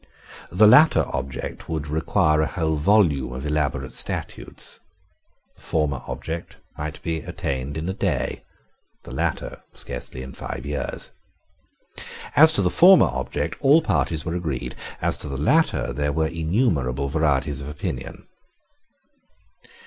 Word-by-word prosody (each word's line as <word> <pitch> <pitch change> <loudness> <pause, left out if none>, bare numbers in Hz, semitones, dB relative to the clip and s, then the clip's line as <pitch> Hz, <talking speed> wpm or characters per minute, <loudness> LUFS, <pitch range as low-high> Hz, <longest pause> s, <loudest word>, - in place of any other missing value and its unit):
The 100 +5 +5
latter 150 +9 +7
object 65 0 -5
would 80 -2 -3
require 75 +1 +2
a 80 - +1
whole 80 -3 -1
volume 75 - +3
of 65 +3 -6
elaborate 70 -3 -1
statutes. - - -4 0.8
The - - -21
former 75 -5 -1
object 85 +1 -6 0.2
might 75 +1 -5
be 80 -1 -1
attained 70 -1 -4
in 80 +2 -3
a 95 - -1
day; 85 -10 -2 0.6
the - - -11
latter, - - -3
scarcely 60 +1 -6
in 65 - -9
five - - -6
years. 75 0 -4 1.2
As 160 +2 +8
to 125 - +1
the 90 - +2
former 180 - +7
object, 70 +4 -3
all 150 +4 +5
parties 80 - 0
were 85 - -2
agreed: 80 -7 -3 0.3
as - - +1
to - - -3
the 70 - -4
latter, 155 - +2
there 75 0 -1
were 80 +2 +1
innumerable 80 - 0
varieties 75 -1 0
of 70 - -6
opinion. 65 -3 -6
75 Hz, 135 wpm, -23 LUFS, 70-85 Hz, 1.2 s, As